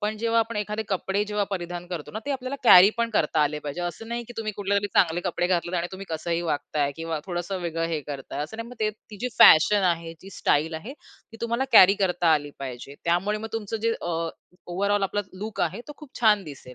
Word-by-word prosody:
पण 210 +1 -2
जेव्हा 230 0 +1
आपण 225 -1 -3
एखादे 210 +1 -2
कपडे 195 +1 -1
जेव्हा 210 0 -1
परिधान 175 -2 -4
करतो 175 -4 -6
ना, 215 - -4
ते - - -2
आपल्याला 265 0 -3
कॅरी 190 -1 +9
पण 235 0 0
करता 155 -7 +1
आले 150 +1 0
पाहिजे. 150 +2 -6
असं 175 +6 -5
नाही 235 0 -3
की - - -8
तुम्ही 215 -1 -3
कुठल्यातरी 200 0 0
चांगले 175 0 +3
कपडे 175 -1 0
घातलेत 175 0 0
आणि 170 - -1
तुम्ही 195 +1 -8
कसंही 165 +1 -2
वागताय 145 -2 -1
किंवा 165 -1 -3
थोडंसं 175 +1 -3
वेगळं 165 -1 -2
हे 160 -2 -2
करताय. 145 0 -6
असं 190 +9 -10
नाही, 230 +1 -6
मग 250 - -10 0.4
ती 210 - -9
जी 250 - -1
फॅशन 195 +6 +7
आहे, 165 0 -7
ती 195 - -11
स्टाईल 160 -3 0
आहे 165 +12 -6
ती 225 - -19
तुम्हाला 235 +3 0
कॅरी 190 +2 +9
करता 175 -3 +2
आली 145 -1 0
पाहिजे. 135 0 -7
त्यामुळे 185 +5 +1
मग 225 +1 -6
तुमचं 225 0 -3
जे 230 0 +2
अ, 165 -1 -2 0.4
ओव्हरऑल 200 +3 0
आपला 200 +1 0 0.2
लूक 215 +2 -5
आहे 175 +6 -1
तो 295 - -6
खूप 300 -4 -13
छान 210 -3 +4
दिसेल. 135 -4 -11
185 Hz, 220 wpm, -25 LUFS, 165-215 Hz, 0.4 s, कॅरी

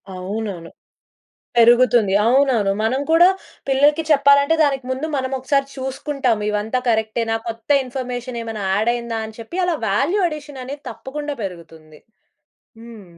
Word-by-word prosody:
అవునవును. 190 -2 -5 0.9
పెరుగుతుంది. 235 -3 +5
అవునవును. 245 -5 +3
మనం 260 +5 0
కూడా 345 +2 +7 0.4
పిల్లలకి 290 +4 +3
చెప్పాలంటే, 280 +2 +5
దానికి 275 -3 0
ముందు 270 +5 -3
మనమోకసారి 265 +1 -1
చూసుకుంటాం. 265 -3 -2
ఇవంతా 210 +4 -1
కరెక్టేనా, 225 0 0
కొత్త 230 +1 -7
ఇన్ఫర్మేషనేమైనా 245 -4 -5
యాడయిందా 235 +2 -1
అని 220 - -13
చెప్పి, 230 +11 -7
అలా 350 -2 0
వాల్యూ 275 - +1
అడిషననేది 290 -2 -8
తప్పకుండా 290 +2 -6
పెరుగుతుంది. 165 -4 -10 0.8
హ్మ్. 230 -3 -12
245 Hz, 110 wpm, -20 LUFS, 220-280 Hz, 0.9 s, కూడా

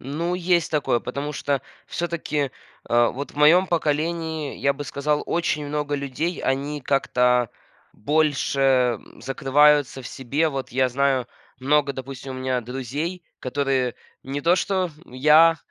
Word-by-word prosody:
Ну, 165 +7 -2
есть 175 -2 +1
такое, 145 -6 +1
потому 140 +4 -4
что 140 -1 -1 0.2
всё-таки, 155 -5 -2 0.3
а 120 0 +3
вот 140 +1 -6
в - - -20
моём 165 +6 +6
поколении, 160 -1 -1
я 140 - +2
бы 145 +1 -7
сказал, 150 +1 -1
очень 150 -3 -1
много 145 0 -2
людей, 140 +5 -3
они 140 +2 -1
как-то 125 -3 +2 0.5
больше, 145 +2 +1
м, 125 -4 +1
закрываются 145 +1 +3
в - - -8
себе. 140 +5 -1
Вот 135 -3 -5
я 130 +1 +2
знаю 135 -1 +1 0.3
много, 140 +1 +2
допустим, 130 0 -7
у - - -6
меня 130 -1 -1
друзей, 135 +9 -4 0.2
которые 130 -2 0 0.3
не 135 +2 -4
то 170 +3 +4
что 185 -2 0 0.2
я, 155 +6 +5
140 Hz, 140 wpm, -23 LUFS, 130-155 Hz, 0.5 s, моём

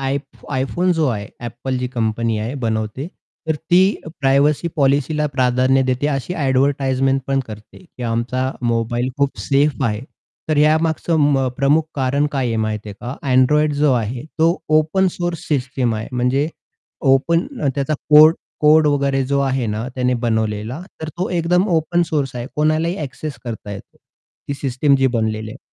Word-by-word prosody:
I 135 +1 0 0.3
iPhone 160 +7 0
जो 160 -2 +1
आहे, 105 -4 -3 0.2
Apple 125 +3 -4
जी 125 0 -2
company 115 -2 -1
आहे 115 +5 -3
बनवते, 110 +4 -2 0.4
तर 160 - +1 0.2
ती 175 +1 +6 0.4
प्रायव्हसी 140 +4 +2
पॉलिसीला 145 +2 +2
प्राधान्य 130 0 +2
देते. 130 +2 0
अशी 140 +4 -2
ॲडव्हर्टाइजमेंट 135 -2 +1
पण 135 0 +1
करते, 105 -1 -11
की 145 -7 -12
आमचा 120 +3 -1
मोबाईल 120 +1 0
खूप 140 -1 0
सेफ 140 0 +1
आहे. 105 -3 -1 0.5
तर 155 - +1
या 155 +1 +5
मागचं 165 +1 0 0.2
मग 135 -2 +1
प्रमुख 140 +4 +3
कारण 140 +2 +1
काय 135 -3 0
आहे, 115 -1 -1
माहिती 110 -1 -2
आहे 100 - -7
का? 125 +3 -6 0.2
Android 150 +4 +4
जो 150 -2 +4
आहे, 120 +1 -2
तो 165 +2 +3 0.2
ओपन 175 +5 +1
सोर्स 175 -2 -4
सिस्टम 130 -4 0
आहे. 110 +1 -5
म्हणजे 125 +4 +1 0.6
ओपन 165 +6 +2 0.3
त्याचा 140 +2 -1 0.2
कोड 155 +2 +8 0.3
कोड 155 +1 +5
वगैरे 140 -2 +1
जो 140 +1 +1
आहे 135 -3 0
ना, 110 +3 -3
त्याने 125 -1 +1
बनवलेला. 110 +3 -1 0.2
तर 160 - -4
तो 185 - -1
एकदम 180 +3 +2
ओपन 175 0 +1
सोर्स 140 -5 -1
आहे. 120 0 -4
कोणालाही 155 +3 +1
एक्सेस 145 +1 -6
करता 115 -3 -6
येतो. 100 - -11 0.5
ती 140 - -1
सिस्टम 140 +1 +1
जी 135 0 +2
बनलेली 110 -3 -1
आहे. - - -10
135 Hz, 165 wpm, -19 LUFS, 120-150 Hz, 0.6 s, कोड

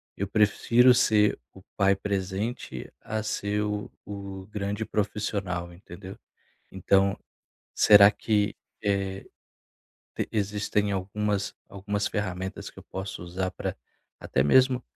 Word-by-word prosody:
eu 100 - -2
prefiro 115 +4 +4
ser 110 -4 +3 0.2
o 95 - -14
pai 100 -1 +4
presente 100 +4 -4
a 110 +1 -3
ser 105 -1 -1
o 105 0 -3
o 100 -2 -7
grande 105 +1 -3
profissional, 100 -5 -2
entendeu? 95 +2 -11 0.5
Então 95 +1 +2 0.6
será 100 -1 +8
que, 105 0 0 0.3
eh, 100 -1 -1 0.9
t - - -3
existem 105 0 0
algumas 100 +1 -1 0.2
algumas 100 +1 -3
ferramentas 95 -3 -4
que - - -17
eu - - -12
posso 95 -1 -6
usar 95 +2 -3
pra - - -5 0.4
até 65 - +1
mesmo 130 - +4
100 Hz, 115 wpm, -27 LUFS, 95-105 Hz, 0.9 s, será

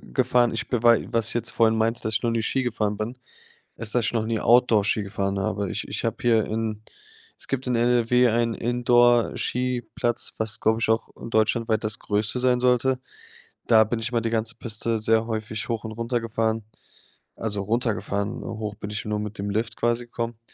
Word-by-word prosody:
gefahren, 125 -2 +1
ich 110 - -3
bewei 120 -1 +3
was 115 -1 +1
ich - - -1
jetzt 115 -1 0
vorhin 110 -1 +3
meinte, 115 +1 0
dass 110 - -2
ich 110 - 0
noch 120 - +2
nie 115 - 0
Ski 130 +3 0
gefahren 105 -3 -1
bin, 110 +4 -4 0.6
ist, 110 -2 -4
dass 120 -3 +2
ich - - 0
noch 110 -2 0
nie 110 -1 -1
Outdoor-Ski 110 -3 +3
gefahren 100 0 -2
habe. 95 +1 -2
Ich - - -3
ich - - -4
hab - - -2
hier 115 -3 +3
in 110 -1 -3 0.5
es - - -10
gibt 130 -1 -2
in 125 - +1
NRW 120 +1 +3
einen 115 0 +1
Indoorskiplatz, 120 0 +1
was, 110 0 0
glaub 110 +1 +2
ich, 115 - +1
auch 110 +1 +1 0.2
deutschlandweit 110 0 +1
das 110 0 -2
Größte 105 +4 -1
sein 125 -1 +2
sollte. 125 +1 +2 0.7
Da 110 -2 +6
bin 110 +2 -2
ich 115 +2 -3
mal 115 - +2
die 115 - -1
ganze 115 0 -1
Piste 115 0 -1
sehr 110 +1 +2
häufig 110 -1 -4
hoch 115 -3 -2
und 110 - -5
runter 115 +1 -2
gefahren, 115 -1 -1 0.7
also 105 -3 -2
runtergefahren. 105 -2 -2
Hoch 105 -2 -5
bin 105 0 -7
ich 110 - -4
nur 105 0 -2
mit 105 +1 -5
dem 100 +1 -3
Lift 110 +2 -2
quasi 120 +1 0
gekommen 115 -1 -5
115 Hz, 195 wpm, -24 LUFS, 110-120 Hz, 0.7 s, Da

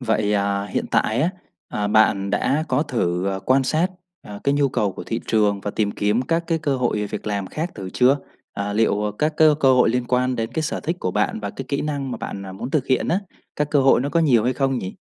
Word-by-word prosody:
Vậy, 110 -4 0
à, 100 0 0
hiện 95 - -3
tại 110 +3 +1
á, 170 - +2 0.4
à, 105 -1 -2
bạn 100 -2 +3
đã 155 +3 +1
có - - +2
thử, 95 - -1
à, 95 - -3
quan 135 +1 +4
sát, 155 +7 +1 0.4
à, 100 -1 -9
cái 140 - +2
nhu 145 -1 +2
cầu 105 -5 0
của - - -8
thị 115 - -3
trường 105 -2 +2
và 105 - -3
tìm 105 0 0
kiếm 105 +5 0
các 165 +5 0
cái 165 -1 0
cơ 145 -3 0
hội, 120 -4 0
ờ, 105 - -2
việc 105 - -6
làm 100 -2 -2
khác 160 - -4
thử 95 -1 -7
chưa? 130 +3 +4 0.4
À, 100 0 -3
liệu, 105 -1 +1
à, - - -1
các 155 +1 +1
cái 155 - +6
cơ 135 -2 +5
hội 125 - +4
liên 125 0 0
quan 125 +1 +1
đến 115 +1 -3
cái 160 - -1
sở 155 - -2
thích 165 +3 -2
của 90 - -1
bạn 105 +2 0
và 100 - -4
cái 135 - -7
kỹ 140 - -1
năng 140 -3 -3
mà 120 - -3
bạn, 100 -1 -6
à, 95 - -7
muốn 120 +7 -6
thực 150 -4 0
hiện 130 - +1
á, 185 - +1 0.4
các 150 0 -1
cơ 145 - +4
hội 135 -2 +5
nó 140 - -1
có 170 - +1
nhiều 125 -9 +3
hay 125 - +2
không 135 0 0
nhỉ? 95 -3 -6
120 Hz, 270 wpm, -22 LUFS, 105-140 Hz, 0.4 s, cái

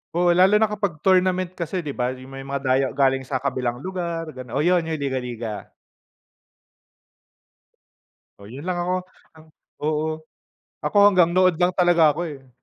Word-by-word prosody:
Oo, 175 0 +3
lalo 185 +4 +5
na 215 0 +3
kapag 200 -7 -3
tournament 185 -1 +2
kasi 180 0 -4
'di 150 - -4
ba, 125 -1 -2
yung 130 +1 -13
may 135 - -8
mga 140 0 -3
dayo 130 +1 +2
galing 135 -1 +1
sa 130 -1 -3
kabilang 125 -2 -2
lugar, 170 -3 -4
ganun, 130 -2 -9
oh, 145 - +1
yun 180 +1 +4
yung 160 - -2
liga-liga. 125 -6 -4 2.7
Oh, 100 - -13
yun 135 - -7
lang 180 - -1
ako, 175 +1 -1 0.9
oo, 155 +1 0 0.8
ako - - -1
hanggang 180 -4 +4
nood 185 -1 +2
lang 175 - +4
talaga 175 -3 +5
ako, 150 +3 -2
eh. 135 -5 -9
155 Hz, 155 wpm, -23 LUFS, 130-180 Hz, 2.7 s, lalo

